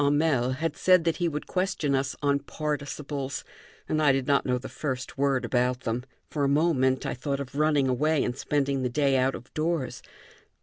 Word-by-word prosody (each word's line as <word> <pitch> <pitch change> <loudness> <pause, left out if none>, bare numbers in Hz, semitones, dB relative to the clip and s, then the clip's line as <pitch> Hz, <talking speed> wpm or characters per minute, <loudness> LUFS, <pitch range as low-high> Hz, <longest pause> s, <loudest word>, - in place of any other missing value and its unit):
Hamel 145 -3 +2
had 155 +3 -2
said 185 -2 +4
that 165 -2 +1
he 175 - +1
would 150 -2 -3
question 185 -6 0
us 135 0 0
on 140 0 +3
participles, 145 -1 -4 0.4
and 155 - 0
I 145 -2 +5
did 135 -1 0
not 140 -1 +2
know 125 0 +2
the 125 - -7
first 130 -4 -4
word 135 -1 +1
about 125 0 +1
them. 120 0 -2 0.3
For 145 - -1
a - - +3
moment 140 -4 +2
I - - -1
thought 140 +2 -3
of 140 -2 -6
running 150 -2 +2
away 145 +4 +2
and 125 - -2
spending 140 -1 0
the 125 - 0
day 140 +1 +2
out 130 +1 +2
of 120 - -11
doors. 155 -4 -1
140 Hz, 200 wpm, -27 LUFS, 130-150 Hz, 0.4 s, I